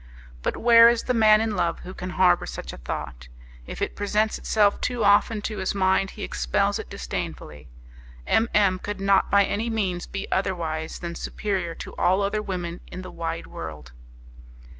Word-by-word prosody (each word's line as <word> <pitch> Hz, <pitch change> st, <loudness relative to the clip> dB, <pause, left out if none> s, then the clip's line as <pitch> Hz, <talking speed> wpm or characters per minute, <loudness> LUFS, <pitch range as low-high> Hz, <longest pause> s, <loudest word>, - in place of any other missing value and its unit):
But -, -, -2 dB
where 230 Hz, 0 st, +8 dB
is 235 Hz, -1 st, 0 dB
the 250 Hz, -, 0 dB
man 215 Hz, -2 st, +5 dB
in 220 Hz, -2 st, -1 dB
love 170 Hz, -2 st, -1 dB
who 185 Hz, -, -8 dB
can 185 Hz, -1 st, -6 dB
harbour 180 Hz, -1 st, +3 dB
such -, -, -7 dB
a -, -, -9 dB
thought? 60 Hz, 0 st, -6 dB, 0.4 s
If -, -, -4 dB
it -, -, -3 dB
presents 210 Hz, +1 st, 0 dB
itself 205 Hz, -2 st, +2 dB
too 245 Hz, -3 st, -1 dB
often 205 Hz, +1 st, +3 dB
to 215 Hz, -2 st, -4 dB
his 190 Hz, +1 st, -2 dB
mind, 190 Hz, 0 st, +2 dB
he -, -, -5 dB
expels -, -, 0 dB
it -, -, -8 dB
disdainfully! 75 Hz, -1 st, -6 dB, 0.6 s
M 225 Hz, +1 st, +2 dB
M 195 Hz, -3 st, +3 dB
could 205 Hz, +1 st, -5 dB
not 195 Hz, 0 st, +3 dB
by 200 Hz, 0 st, +5 dB
any 220 Hz, +5 st, -2 dB
means 190 Hz, -6 st, -2 dB
be 195 Hz, +1 st, -5 dB
otherwise 165 Hz, -5 st, -2 dB
than 170 Hz, -1 st, -6 dB
superior 185 Hz, -2 st, -3 dB
to -, -, -9 dB
all 190 Hz, +3 st, +2 dB
other 205 Hz, +2 st, -1 dB
women 180 Hz, -4 st, -4 dB
in 185 Hz, -, -8 dB
the 185 Hz, -, -9 dB
wide 165 Hz, 0 st, -4 dB
world. 75 Hz, -6 st, -8 dB
190 Hz, 180 wpm, -25 LUFS, 170-210 Hz, 0.6 s, where